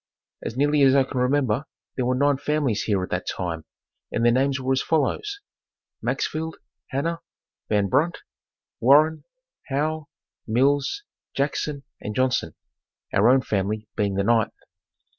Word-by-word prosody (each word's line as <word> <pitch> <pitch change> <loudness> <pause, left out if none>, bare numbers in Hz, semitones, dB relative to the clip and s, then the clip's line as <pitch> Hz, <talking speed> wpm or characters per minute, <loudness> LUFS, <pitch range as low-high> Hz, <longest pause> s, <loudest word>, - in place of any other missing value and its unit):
As 115 - -5
nearly 145 +1 +3
as 135 -1 +6
I 135 - +5
can 130 0 -4
remember 130 -1 +1 0.3
there 125 -2 0
were 125 - +2
nine 140 +1 +3
families 140 -6 0
here 100 -4 +1
at - - -6
that 90 +1 -2
time 85 -3 -3 0.5
and 115 - 0
their 120 - +6
names 135 +2 +2
were 130 0 -1
as 130 - +1
follows: 165 - 0 0.6
Maxfield, 160 +1 -2 0.3
Hanna, 165 +5 -2 0.5
Van 105 -2 +2
Brunt, 165 - +2 0.6
Warren, 150 +6 +5 0.4
Howe, 150 +2 -1 0.4
Mills, 140 - +2 0.3
Jackson 140 0 -1 0.2
and 105 - -5
Johnson, 130 - +1 0.6
our 105 +4 +5
own 130 +1 +5
family 105 +2 -1
being 100 -3 0
the 100 - +1
ninth. 115 0 +2
130 Hz, 140 wpm, -24 LUFS, 110-145 Hz, 0.6 s, as